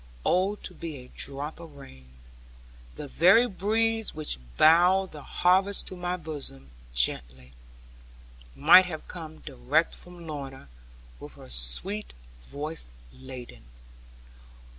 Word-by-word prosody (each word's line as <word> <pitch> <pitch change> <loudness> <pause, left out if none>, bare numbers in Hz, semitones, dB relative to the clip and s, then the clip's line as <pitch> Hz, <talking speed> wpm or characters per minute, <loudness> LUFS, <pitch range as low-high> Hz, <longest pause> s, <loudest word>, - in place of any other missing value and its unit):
Oh, 190 +3 +2
to - - -8
be 165 -3 -7
a 125 -2 -11
drop 140 +3 -3
of 165 -3 -12
rain! 65 - -14 0.9
The 150 - -6
very 185 - +5
breeze 225 +2 0
which 155 - -3 0.2
bowed 180 +4 +5
the 150 - -9
harvest 190 +6 +2
to - - -8
my 180 0 -3
bosom 145 - -6 0.2
gently, 60 +1 0 1.0
might 185 - +7
have 155 -3 -7
come 160 -3 -9
direct 140 +4 0
from 175 -1 -11
Lorna, 135 - -7 0.5
with - - -10
her - - -13
sweet - - -1 0.3
voice 145 - -6 0.2
laden. 125 - -10
155 Hz, 120 wpm, -27 LUFS, 130-180 Hz, 1.0 s, might